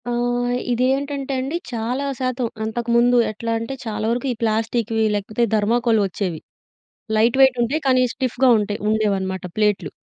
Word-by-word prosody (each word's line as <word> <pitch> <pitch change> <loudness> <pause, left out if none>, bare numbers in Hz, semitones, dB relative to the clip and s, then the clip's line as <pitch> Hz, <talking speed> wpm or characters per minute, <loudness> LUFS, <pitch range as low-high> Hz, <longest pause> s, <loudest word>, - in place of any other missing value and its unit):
ఆహ్, 245 0 0 0.2
ఇది 245 +1 +2
ఏంటంటే 280 0 -3
అండి 270 +6 -2
చాలా 245 +4 -2
శాతం 255 -1 -1 0.2
అంతకుముందు 235 +2 +2
ఎట్లా 230 +2 -4
అంటే 230 +4 -5
చాలా 215 -1 -3
వరకు 245 +3 -1
ఈ - - -3
ప్లాస్టిక్‌వి, 225 0 0
లేకపోతే 210 +3 -1
థర్మోకోల్‌వి 225 +1 +2
వచ్చేవి. 180 -4 -4 0.8
లైట్ 230 +4 +3
వెయిట్ 265 -1 +5
ఉంటయి. 260 +7 0
కానీ, 255 -1 +4
స్టిఫ్‌గా 260 -1 +1
ఉంటయి 205 -1 -2
ఉండేవనమాట 195 -4 0
ప్లేట్లు. 210 -2 +1
235 Hz, 145 wpm, -21 LUFS, 215-255 Hz, 0.8 s, వెయిట్